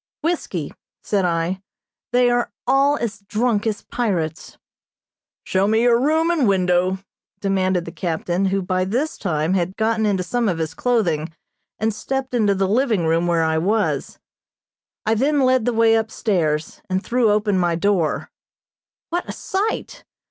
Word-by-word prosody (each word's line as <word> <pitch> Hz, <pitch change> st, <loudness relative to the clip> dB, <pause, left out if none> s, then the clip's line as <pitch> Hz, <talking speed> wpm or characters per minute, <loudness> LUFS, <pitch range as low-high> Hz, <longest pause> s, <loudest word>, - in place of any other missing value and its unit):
"Whiskey," 250 Hz, -, -2 dB, 0.3 s
said 200 Hz, -3 st, +1 dB
I. 170 Hz, +2 st, -1 dB, 0.5 s
"They 245 Hz, 0 st, +4 dB
are 240 Hz, 0 st, 0 dB
all 280 Hz, +2 st, +3 dB
as 220 Hz, -5 st, -3 dB
drunk 215 Hz, +2 st, 0 dB
as 215 Hz, -2 st, -2 dB
pirates." 175 Hz, -9 st, -3 dB, 0.9 s
"Show 190 Hz, +1 st, +1 dB
me 220 Hz, +2 st, +3 dB
your 240 Hz, -1 st, +4 dB
room 315 Hz, +5 st, +2 dB
and 305 Hz, -9 st, +2 dB
window," 185 Hz, -1 st, +2 dB, 0.4 s
demanded 190 Hz, -3 st, 0 dB
the 165 Hz, -, -7 dB
captain, 175 Hz, +2 st, -1 dB
who 195 Hz, 0 st, 0 dB
by 185 Hz, 0 st, 0 dB
this 250 Hz, +12 st, -1 dB
time 160 Hz, -2 st, -1 dB
had 185 Hz, 0 st, -1 dB
gotten 220 Hz, 0 st, +1 dB
into 190 Hz, -3 st, +1 dB
some 235 Hz, +3 st, 0 dB
of 175 Hz, -, -1 dB
his 160 Hz, -1 st, -3 dB
clothing, 175 Hz, -11 st, 0 dB, 0.5 s
and 220 Hz, 0 st, 0 dB
stepped 260 Hz, +5 st, -3 dB
into 210 Hz, -5 st, +2 dB
the 195 Hz, 0 st, +1 dB
living 220 Hz, -4 st, +1 dB
room 165 Hz, +2 st, +2 dB
where 170 Hz, -1 st, +2 dB
I 160 Hz, 0 st, +1 dB
was. 180 Hz, -6 st, 0 dB, 0.9 s
I 220 Hz, -, +3 dB
then 280 Hz, +6 st, +2 dB
led 255 Hz, -3 st, +3 dB
the 245 Hz, -, +2 dB
way 225 Hz, 0 st, +4 dB
upstairs, 190 Hz, -9 st, 0 dB
and 185 Hz, +1 st, -1 dB
threw 240 Hz, -2 st, +2 dB
open 205 Hz, -2 st, +2 dB
my 175 Hz, -2 st, +1 dB
door. 175 Hz, -3 st, 0 dB, 0.8 s
What 350 Hz, +1 st, -2 dB
a -, -, -1 dB
sight! 405 Hz, +3 st, -3 dB
205 Hz, 155 wpm, -21 LUFS, 180-240 Hz, 0.9 s, They